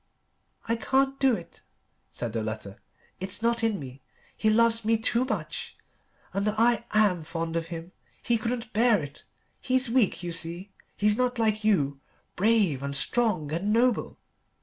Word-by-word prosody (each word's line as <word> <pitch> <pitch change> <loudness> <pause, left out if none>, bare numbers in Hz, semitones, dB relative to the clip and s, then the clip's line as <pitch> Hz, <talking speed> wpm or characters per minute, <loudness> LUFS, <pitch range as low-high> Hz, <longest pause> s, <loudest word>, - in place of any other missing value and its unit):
"I 230 +1 +1
can't 270 +3 +1
do 265 -3 +4
it," - - -10 0.5
said 120 -3 -4
the 115 - -1
letter, 110 -2 -6 0.4
"it's 190 +4 -6
not 235 0 +1
in 220 -4 +1
me. 130 -1 -9 0.3
He 215 - +1
loves 230 +1 +4
me 225 +1 +2
too 235 +3 +1
much. 260 - -4 0.6
And 200 +1 0
I 230 +2 +2
am 205 -5 +3
fond 165 +1 -4
of 165 0 -2
him. 165 +1 -7 0.3
He 235 -2 +1
couldn't 230 0 -4
bear 220 -4 +3
it. 145 0 -10 0.4
He's 260 -2 +1
weak, 235 -7 +2
you 175 - -3
see. 170 +4 -1 0.3
He's 210 +1 +2
not 250 0 0
like 215 -1 +1
you 145 -10 +1 0.4
brave 200 - +2
and 140 0 -4
strong 185 -4 +1
and 180 +6 -1
noble. 240 +2 +1
215 Hz, 160 wpm, -27 LUFS, 165-230 Hz, 0.6 s, do